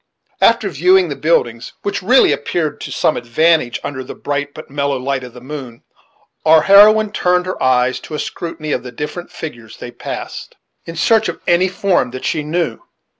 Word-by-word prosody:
After 230 -2 +4
viewing 180 +2 +3
the 140 - -3
buildings, 120 -8 0
which 200 - -2
really 245 +8 +5
appeared 155 -4 -2
to - - -6
some - - +1
advantage 125 +2 +1
under 135 -2 -5
the - - -9
bright 145 0 -3
but 155 - -11
mellow 140 0 -1
light 130 0 -2
of 125 -2 -10
the 125 - -11
moon, 130 -3 -8 0.6
our 160 0 +5
heroine 210 +3 +6
turned 180 -3 +1
her 185 - -5
eyes 130 0 +2
to 155 - -8
a - - -4
scrutiny 165 -3 -5
of 125 - 0
the 125 0 -9
different 150 +7 -6
figures 120 -8 -9
they 120 - -8
passed, 120 - -7 0.3
in 165 - -7
search 220 +6 +2
of - - -6
any 175 +2 +3
form 185 -6 0
that 130 +1 -7
she 155 - 0
knew. 165 +3 -2
155 Hz, 185 wpm, -17 LUFS, 130-180 Hz, 0.6 s, heroine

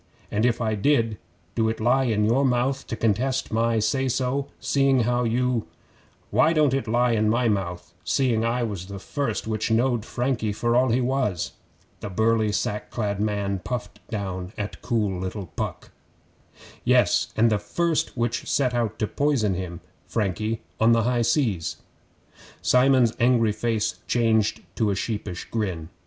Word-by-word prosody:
'An' 105 +3 +1
if 120 -2 +2
I 110 -2 0
did, 115 -1 +1 0.3
do 110 -1 +1
it 115 - -3
lie 125 +4 +3
in 105 -3 +1
your 120 +6 +3
mouth 130 +1 0
to - - -3
contest 115 +4 0
my 115 0 +2
say 130 +5 +1
so, 130 +2 -1
seeing 135 -2 +2
how 120 +1 +1
you 120 0 0 0.3
' - - -33
'Why 160 +1 +4
don't 150 -4 +3
it 135 -4 -1
lie 120 +2 +2
in 110 -1 +2
my 120 +2 +2
mouth, 95 -5 -2
seeing 120 -5 +1
I 120 +1 0
was 100 -5 -4
the 100 0 -7
first 115 +3 -3
which 110 0 -2
knowed 120 0 +2
Frankie 120 -3 -1
for 120 +3 0
all 130 +1 +4
he 120 +3 +2
was?' 125 -9 0 0.5
The 105 - -6
burly 110 +2 +2
sack 105 0 -2
clad 100 -4 -2
man 100 -2 -1
puffed 125 +6 -5
down 95 -3 -4
at 105 0 -5
cool 105 -6 0
little 95 +2 -4
Puck. - - -4 0.9
'Yes, - - +3
and 115 +1 +4
the 105 - +2
first 160 +9 -1
which 120 0 -1
set 130 -3 +1
out 115 -3 -1
to 110 - 0
poison 130 -5 +1
him 90 -1 -5 0.3
Frankie 110 +1 -1 0.2
on 115 +1 +5
the 115 -1 +3
high 120 +1 +1
seas 115 - +1 0.4
' - - -23
Simon's 125 -2 +4
angry 120 -2 +4
face 110 0 -1
changed 110 -3 +2
to 110 -2 +2
a 100 - +1
sheepish 100 -3 -4
grin. 90 -8 -2
115 Hz, 170 wpm, -25 LUFS, 105-125 Hz, 0.9 s, on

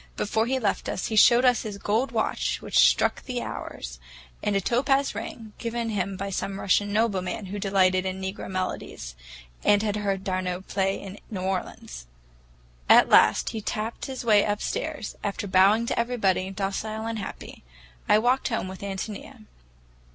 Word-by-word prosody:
Before 220 +2 0
he 265 +1 +1
left 215 -6 -1
us, - - -3
he 220 - -2
showed 240 +4 +6
us 250 -1 +4
his 210 -3 -6
gold 220 +6 0
watch - - -1
which - - +1
struck - - +4
the 250 -2 -3
hours, - - -7 0.4
and 205 - 0
a - - +3
topaz 270 +7 +1
ring, 220 0 -7
given 230 -1 -2
him 195 -2 -2
by 195 +1 -4
some 195 +1 -3
Russian 205 +1 +2
nobleman 205 -2 0
who 200 +2 -5
delighted 185 -2 +2
in 190 0 -3
negro 190 +1 -5
melodies, 185 - -4 0.5
and 205 0 +4
had 210 -1 -1
heard 195 -2 -1
d'Arnault 185 -1 -2
play 195 0 -1
in 200 +1 -9
New 195 -4 -4
Orleans. 180 - -4 0.8
At - - +7
last - - +5
he 220 - -4
tapped 215 +5 -4
his 260 -2 -6
way 210 -3 +5
upstairs, 220 +5 -3
after 205 0 -3
bowing 200 +4 +4
to - - -1
everybody, 205 -6 +1
docile 205 +3 -3
and 225 -1 -3
happy. 195 - -8 0.5
I - - +7
walked 245 +4 +2
home 225 -6 -2
with 190 0 -8
Ántonia. 205 +4 -6
205 Hz, 165 wpm, -26 LUFS, 190-225 Hz, 0.8 s, At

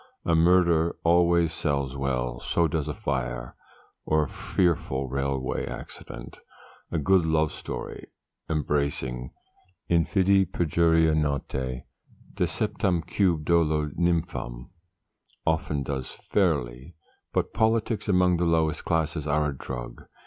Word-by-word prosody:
A 85 - +2
murder 85 0 +4
always 85 -1 +4
sells 70 -4 -1
well, 60 -3 -2
so 85 +6 +1
does 80 -1 -2
a 75 - -2
fire, - - -3 0.5
or 80 0 +2
a - - -3
fearful 75 -7 0
railway 70 0 -2
accident. - - -9 0.5
A 85 - -1
good 90 +4 +3
love 80 -1 +2
story, - - -7 0.4
embracing 70 -5 -1 0.6
'infidi 95 +2 +3
perjuria 80 -1 +3
nautæ 65 -4 -1 0.5
Deceptamque 85 -2 0
dolo 75 -2 +2
nympham' 85 -8 -1 0.7
often 75 -3 0
does 65 -2 -4
fairly; 65 +7 -1 0.4
but - - -1
politics 110 -1 +1
among 90 -2 +4
the 85 - +1
lowest 80 -2 +1
class 80 -1 0
are 75 +1 +2
a 70 - -5
drug. 60 -2 -7
80 Hz, 110 wpm, -26 LUFS, 70-85 Hz, 0.7 s, murder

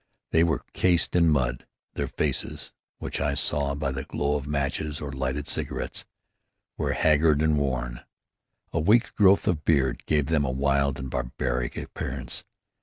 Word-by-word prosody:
They 80 - +5
were 85 -1 +1
cased 90 -2 +2
in 85 -2 +5
mud. 65 -5 0 0.3
Their - - -2
faces, - - -2 0.2
which - - -4
I 70 0 +1
saw 70 0 0
by 70 -2 -1
the 65 0 -4
glow 70 +1 -1
of 70 -1 -3
matches 75 +1 -2
or 70 -1 -5
lighted 65 +2 -2
cigarettes, - - -3 0.7
were - - -1
haggard 75 -1 +4
and 80 0 +3
worn. 65 -4 -1 0.7
A 85 - +1
week's 105 +9 +4
growth 100 -1 +4
of 75 -4 +1
beard 70 -5 +2
gave 75 -2 +2
them 75 0 +2
a 70 - 0
wild 70 +1 +1
and 65 0 -6
barbaric - - -2
appearance. - - -4
70 Hz, 160 wpm, -26 LUFS, 65-80 Hz, 0.7 s, They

